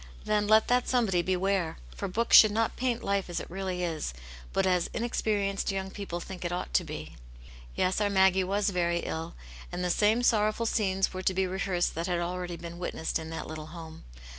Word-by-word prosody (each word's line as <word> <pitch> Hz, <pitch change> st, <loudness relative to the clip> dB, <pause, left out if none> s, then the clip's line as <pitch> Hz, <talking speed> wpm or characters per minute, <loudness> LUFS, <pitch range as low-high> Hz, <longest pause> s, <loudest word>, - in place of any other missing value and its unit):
Then 210 Hz, -1 st, +1 dB
let 215 Hz, +1 st, +5 dB
that 245 Hz, 0 st, +2 dB
somebody 220 Hz, -8 st, +2 dB
beware! 185 Hz, -1 st, 0 dB, 0.2 s
For -, -, -3 dB
books 230 Hz, +5 st, +3 dB
should 215 Hz, -, +10 dB
not 225 Hz, +2 st, 0 dB
paint 245 Hz, -2 st, -1 dB
life 200 Hz, -2 st, 0 dB
as 175 Hz, -, -2 dB
it -, -, -9 dB
really 185 Hz, -1 st, -3 dB
is, 160 Hz, -, -3 dB, 0.4 s
but 195 Hz, -, +1 dB
as 180 Hz, -2 st, +2 dB
inexperienced 205 Hz, -4 st, 0 dB
young 190 Hz, 0 st, -3 dB
people 190 Hz, -4 st, -5 dB
think 180 Hz, +1 st, -8 dB
it 175 Hz, -, -2 dB
ought 175 Hz, -, -4 dB
to 65 Hz, -, +3 dB
be. -, -, -8 dB, 0.6 s
Yes, 185 Hz, +3 st, +1 dB
our 205 Hz, -, +2 dB
Maggie 190 Hz, -1 st, +4 dB
was 200 Hz, +2 st, 0 dB
very 170 Hz, -1 st, 0 dB
ill, 165 Hz, +1 st, -5 dB, 0.4 s
and 180 Hz, 0 st, -3 dB
the 180 Hz, -, +1 dB
same 215 Hz, +6 st, +3 dB
sorrow 215 Hz, -3 st, +3 dB
ful 230 Hz, -, -3 dB
scenes 195 Hz, -4 st, +1 dB
were 185 Hz, -, -4 dB
to 185 Hz, 0 st, 0 dB
be 190 Hz, 0 st, +2 dB
rehearsed 185 Hz, -1 st, -1 dB
that 165 Hz, +2 st, -3 dB
had 180 Hz, -1 st, 0 dB
already 175 Hz, 0 st, -3 dB
been 170 Hz, +1 st, -8 dB
witnessed 170 Hz, -3 st, -2 dB
in 160 Hz, 0 st, -7 dB
that 165 Hz, -, -5 dB
little 155 Hz, -1 st, -7 dB
home. 160 Hz, -1 st, -10 dB
190 Hz, 210 wpm, -29 LUFS, 175-205 Hz, 0.6 s, should